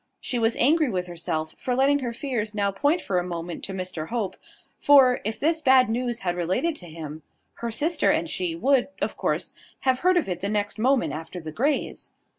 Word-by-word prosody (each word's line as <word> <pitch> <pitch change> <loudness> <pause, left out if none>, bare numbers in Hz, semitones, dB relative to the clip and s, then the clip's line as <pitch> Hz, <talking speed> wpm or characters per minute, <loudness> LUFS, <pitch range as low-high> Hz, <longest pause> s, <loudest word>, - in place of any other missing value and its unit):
She 245 - -2
was 225 0 +2
angry 300 +2 +3
with 180 -4 -2
herself 165 -2 -3
for 250 - -1
letting 275 +2 +3
her 245 -3 -3
fears 230 -4 -3
now 200 -1 +1
point 285 - +1
for 185 -2 0
a - - -2
moment 170 -1 -5
to - - -7
Mr 185 -4 -4
Hope; 220 -6 -2 0.4
for, 265 -3 +6
if 215 +2 -3
this 320 +2 +1
bad 260 -4 +5
news 240 0 -2
had 175 -2 -1
related 185 - 0
to 175 - -10
him, 155 -1 -8 0.4
her 235 - -3
sister 300 +8 +1
and 170 - +1
she 170 +1 -2
would, 255 +7 +2
of - - -2
course, - - -1 0.3
have 260 -1 +2
heard 365 0 +3
of 345 - +1
it 180 -2 -3
the 200 - -1
next 205 0 -1
moment 260 +2 +2
after 160 +3 -6
the 160 -2 -7
Greys. 275 - -1
220 Hz, 210 wpm, -25 LUFS, 180-265 Hz, 0.4 s, for